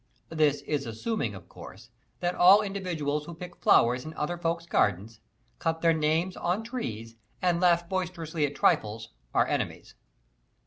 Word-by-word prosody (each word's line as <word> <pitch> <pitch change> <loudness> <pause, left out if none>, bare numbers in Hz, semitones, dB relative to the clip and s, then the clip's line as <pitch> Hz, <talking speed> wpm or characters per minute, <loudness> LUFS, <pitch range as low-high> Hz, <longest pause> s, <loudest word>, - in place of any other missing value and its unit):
This 150 -3 +2
is 140 -3 -3
assuming, 220 - -3
of - - -12
course, - - -13 0.3
that 175 0 0
all 190 +5 +7
individuals 165 -7 -3
who 170 - -8
pick 175 +1 -9
flowers 125 +2 +4
in 155 +1 -8
other 150 +4 -2
folks' 170 0 -2
gardens, 105 - 0 0.4
cut 160 -1 -1
their 165 -1 +4
names 160 +4 0
on 180 +6 -1
trees, 115 - -6 0.2
and 175 -1 +1
laugh 175 -1 +3
boisterously 170 -4 -3
at 145 - -9
trifles, 110 -1 +1 0.2
are - - +3
enemies. - - -3
165 Hz, 150 wpm, -28 LUFS, 145-180 Hz, 0.4 s, all